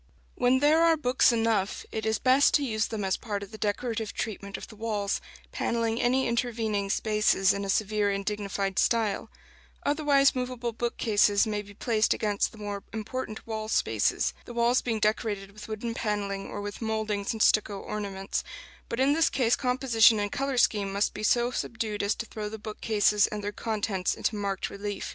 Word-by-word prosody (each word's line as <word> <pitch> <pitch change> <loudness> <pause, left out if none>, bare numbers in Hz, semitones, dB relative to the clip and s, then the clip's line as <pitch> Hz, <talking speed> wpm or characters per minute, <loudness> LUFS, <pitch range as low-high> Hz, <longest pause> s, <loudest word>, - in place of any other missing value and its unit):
When 250 +1 +2
there 305 +3 +5
are 330 -1 +5
books 255 -3 +3
enough, 225 -4 0
it 220 0 -3
is 220 0 +1
best 265 +2 +4
to 290 - +3
use 215 -3 0
them 215 -2 -4
as 190 - +1
part 205 -3 -4
of 200 - -11
the 220 - -8
decorative 220 +1 -2
treatment 200 -3 -4
of - - -9
the 220 - -13
walls, 210 -2 -2 0.3
panelling 230 0 -1
any 255 +2 +2
intervening 225 -4 -1
spaces 210 -2 +2
in 200 - -3
a 195 - -4
severe 210 0 +1
and 200 0 -2
dignified 200 -2 -2
style; 225 -4 +1 0.6
otherwise 285 -2 +4
movable 250 -2 -3
bookcases 215 -3 +2
may 210 -1 -2
be 205 0 -14
placed 220 0 +1
against 205 -2 0
the - - -15
more 205 -1 -5
important 220 0 -5
wall 220 -1 -4
spaces, - - +1
the 240 - -9
walls 235 +2 +3
being 225 -3 -1
decorated 210 -2 -1
with 210 +1 -11
wooden 225 +2 -4
panelling 200 -3 -2
or 205 - -5
with 205 +2 -6
mouldings 220 -2 -1
and 220 -1 0
stucco 210 -2 +3
ornaments; 195 -2 -4 0.5
but 230 - -3
in 270 +2 +4
this 325 +1 +3
case 245 -3 +2
composition 250 -4 +4
and 205 0 -2
color 275 -1 -2
scheme 205 -4 +2
must 200 +2 0
be 210 - -6
so 240 +3 +2
subdued 225 -4 -3
as 200 +1 +1
to - - -5
throw 215 -2 -5
the 220 - -6
bookcases 210 -1 +1
and 210 -1 -5
their 205 - -2
contents 210 -4 -1
into 220 - -1
marked 200 -2 -2
relief. 205 0 -5
215 Hz, 185 wpm, -28 LUFS, 205-235 Hz, 0.6 s, there